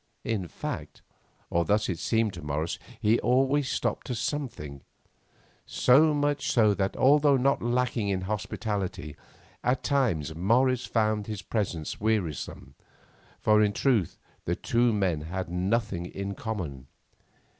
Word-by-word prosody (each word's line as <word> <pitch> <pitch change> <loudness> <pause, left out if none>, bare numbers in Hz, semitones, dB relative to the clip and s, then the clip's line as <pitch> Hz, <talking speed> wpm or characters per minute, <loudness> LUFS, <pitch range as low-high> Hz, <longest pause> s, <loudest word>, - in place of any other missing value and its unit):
In 105 -6 -2
fact, - - -6 0.5
or 85 - +2
thus 105 +5 +1
it 90 -4 -3
seemed 110 -3 +1
to 85 - -8
Morris, 75 +2 -2 0.2
he 110 +3 +3
always 135 +2 +2
stopped - - -2
to 125 - -2
something, 115 - -4 0.9
so 150 +5 +5
much 145 0 0
so 110 -4 +4
that 95 -1 -2
although 145 +1 +5
not 135 +2 +2
lacking 120 -3 0
in 95 -1 0
hospitality, 100 -4 -3 0.5
at 125 +1 +1
times 105 - +1
Morris 125 +9 +2
found 110 -2 0
his 105 -3 -5
presence 90 -9 -3
wearisome, 90 -10 -2 0.7
for 105 0 +4
in 105 -1 +2
truth 115 - +1 0.3
the - - 0
two 120 0 +2
men 95 -7 0
had 90 +3 -4
nothing 90 0 -1
in 100 +1 -5
common. 85 - -5
105 Hz, 135 wpm, -28 LUFS, 90-125 Hz, 0.9 s, so